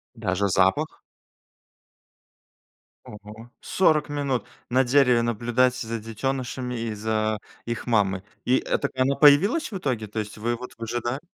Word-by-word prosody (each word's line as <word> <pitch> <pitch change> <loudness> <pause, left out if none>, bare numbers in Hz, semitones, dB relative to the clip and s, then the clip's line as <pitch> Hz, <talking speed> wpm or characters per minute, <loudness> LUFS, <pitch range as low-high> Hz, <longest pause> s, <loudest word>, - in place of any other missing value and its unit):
Даже 100 -3 0
запах? 95 - +1 2.1
Ого, 105 +3 -11
40 155 -6 +2
минут 140 -4 -1 0.2
на 130 +2 +3
дереве 125 -2 +4
наблюдать 120 +2 +1
за 115 -2 -4
детёнышами 125 +2 -3
и 115 -1 -3
за 110 0 -1 0.3
их 120 +1 -4
мамой! 100 -5 +1 0.2
И, 130 +1 +4
э, - - -1
так - - -3
она 130 +2 +2
появилась 180 - +5
в 200 - -3
итоге? 125 - -2
То 105 +2 -4
есть 105 0 -5
вы 120 +3 -1
вот 125 +1 -9
выжидали? 120 +3 -3
120 Hz, 140 wpm, -25 LUFS, 110-130 Hz, 2.1 s, появилась